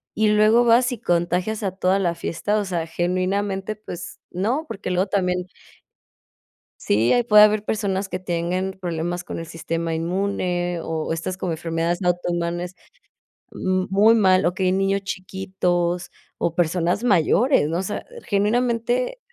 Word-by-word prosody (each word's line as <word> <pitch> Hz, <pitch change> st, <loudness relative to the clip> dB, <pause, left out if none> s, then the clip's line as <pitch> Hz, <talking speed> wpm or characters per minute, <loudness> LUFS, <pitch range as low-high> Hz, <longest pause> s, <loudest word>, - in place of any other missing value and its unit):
y 215 Hz, 0 st, +2 dB
luego 215 Hz, +3 st, +5 dB
vas 240 Hz, +2 st, +4 dB
y 245 Hz, -, -5 dB
contagias 180 Hz, +2 st, 0 dB
a 195 Hz, -, 0 dB
toda 190 Hz, +1 st, +1 dB
la 175 Hz, -3 st, 0 dB
fiesta, 205 Hz, +5 st, -2 dB
o 210 Hz, -, -1 dB
sea, 170 Hz, -3 st, -2 dB
genuinamente, 190 Hz, +4 st, -1 dB
pues 180 Hz, -4 st, -9 dB
no, 230 Hz, -, -1 dB
porque 195 Hz, -6 st, -5 dB
luego 180 Hz, +2 st, +1 dB
también 180 Hz, -2 st, 0 dB, 1.4 s
sí, 110 Hz, +3 st, +2 dB
ahí 245 Hz, -, +4 dB
puede 210 Hz, -3 st, +7 dB
haber 215 Hz, 0 st, +2 dB
personas 200 Hz, -3 st, -1 dB
que 185 Hz, -, -3 dB
tengan 180 Hz, +1 st, -2 dB
problemas 175 Hz, 0 st, -3 dB
con -, -, -6 dB
el 165 Hz, -, -6 dB
sistema 165 Hz, 0 st, -3 dB
inmune, 175 Hz, 0 st, -1 dB
o 160 Hz, 0 st, -3 dB
estas 170 Hz, +3 st, -4 dB
como 180 Hz, -3 st, -2 dB
enfermedades, 165 Hz, +2 st, -2 dB
no, 180 Hz, -, +1 dB
autoinmunes, 175 Hz, 0 st, -2 dB, 0.8 s
mm, 185 Hz, 0 st, -1 dB
muy 210 Hz, +4 st, +5 dB
mal, 185 Hz, -5 st, +4 dB
o 175 Hz, -, +1 dB
que 190 Hz, -, -4 dB
hay 185 Hz, -, +3 dB
niños 195 Hz, +1 st, +1 dB
chiquitos, 185 Hz, -2 st, -2 dB, 0.3 s
o 165 Hz, -, -1 dB
personas 175 Hz, +4 st, 0 dB
mayores, 205 Hz, -, +3 dB
¿no?, 165 Hz, +2 st, -1 dB
o -, -, -1 dB
sea, 195 Hz, -, -4 dB, 0.2 s
genuinamente 235 Hz, -, 0 dB
185 Hz, 155 wpm, -22 LUFS, 175-205 Hz, 1.4 s, puede